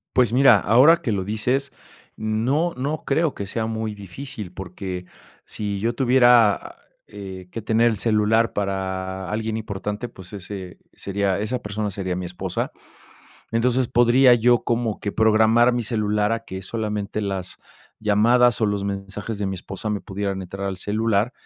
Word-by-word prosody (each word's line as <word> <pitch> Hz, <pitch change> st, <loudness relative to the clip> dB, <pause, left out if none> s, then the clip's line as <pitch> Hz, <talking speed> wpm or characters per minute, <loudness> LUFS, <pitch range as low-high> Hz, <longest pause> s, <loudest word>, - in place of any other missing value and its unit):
Pues 125 Hz, -3 st, +4 dB
mira, 125 Hz, -4 st, +6 dB
ahora 135 Hz, -, +5 dB
que 125 Hz, -9 st, -1 dB
lo 95 Hz, -2 st, -1 dB
dices, 125 Hz, +7 st, -1 dB, 0.4 s
no, 120 Hz, +10 st, 0 dB
no 145 Hz, +4 st, -3 dB
creo 160 Hz, +1 st, +1 dB
que 100 Hz, -, -6 dB
sea 110 Hz, +3 st, -2 dB
muy 110 Hz, -1 st, -3 dB
difícil, 100 Hz, -1 st, -8 dB
porque 90 Hz, -1 st, -6 dB, 0.4 s
sí 100 Hz, -2 st, -4 dB
yo 115 Hz, +3 st, -1 dB
tuviera, 120 Hz, -4 st, +4 dB, 0.3 s
eh, 95 Hz, -3 st, -9 dB
que 115 Hz, -, -6 dB
tener 115 Hz, +2 st, +3 dB
el 110 Hz, -, -2 dB
celular 110 Hz, +1 st, +2 dB
para 95 Hz, -1 st, -3 dB
alguien 110 Hz, 0 st, -2 dB
importante, 105 Hz, +1 st, -4 dB
pues, 95 Hz, -4 st, -13 dB
ese 95 Hz, -2 st, -8 dB, 0.2 s
sería 100 Hz, -1 st, -1 dB
esa 120 Hz, +4 st, -3 dB
persona 105 Hz, 0 st, -3 dB
sería 95 Hz, -2 st, -3 dB
mi 90 Hz, 0 st, -4 dB
esposa. 90 Hz, 0 st, -3 dB, 0.8 s
Entonces, 125 Hz, +2 st, +2 dB
podría 120 Hz, +2 st, +5 dB
yo 120 Hz, +1 st, +3 dB
como 115 Hz, -2 st, -1 dB
que 100 Hz, -, -4 dB
programar 110 Hz, +2 st, +4 dB
mi 120 Hz, -2 st, -1 dB
celular 105 Hz, -1 st, 0 dB
a 115 Hz, -, -1 dB
que 95 Hz, -3 st, -7 dB
solamente 105 Hz, 0 st, -3 dB
las 95 Hz, -3 st, -4 dB, 0.4 s
llamadas 115 Hz, +3 st, +4 dB
o 110 Hz, -, +3 dB
los 105 Hz, -1 st, -1 dB
mensajes 100 Hz, +2 st, -4 dB
de 100 Hz, -, -1 dB
mi 95 Hz, -, -2 dB
esposa 95 Hz, +4 st, -6 dB
me 105 Hz, -1 st, -1 dB
pudieran 95 Hz, -1 st, -4 dB
entrar 95 Hz, +2 st, -6 dB
al 95 Hz, -1 st, -4 dB
celular, 110 Hz, +3 st, 0 dB
105 Hz, 160 wpm, -23 LUFS, 100-120 Hz, 0.8 s, mira